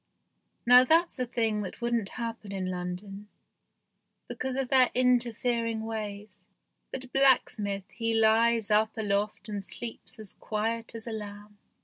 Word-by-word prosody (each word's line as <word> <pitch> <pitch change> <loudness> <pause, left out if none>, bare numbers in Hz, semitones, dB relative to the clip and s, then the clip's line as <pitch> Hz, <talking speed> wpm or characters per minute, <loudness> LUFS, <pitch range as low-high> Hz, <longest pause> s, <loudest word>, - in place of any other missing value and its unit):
Now 250 +1 +8
that's 325 +2 +3
a 250 - -1
thing 225 -3 0
that 190 - -6
wouldn't 235 -4 -1
happen 230 -3 -5
in 185 -2 -3
London, 185 +3 -6 1.0
because 260 0 -2
of 265 -2 -1
their 260 -2 +5
interfer 245 -2 +2
ing 220 -1 -3
ways, 210 -2 -6 0.5
but 260 -1 -7
blacksmith 210 -7 +2
he 230 -1 -2
lies 225 0 +3
up 215 +1 +2
aloft 205 -1 -1
and 205 -2 -4
sleeps 225 +6 -6
as 215 -3 -7
quiet 225 +2 -3
as 225 - -7
a 235 - -5
lamb. 205 -1 -8
220 Hz, 140 wpm, -28 LUFS, 205-240 Hz, 1.0 s, Now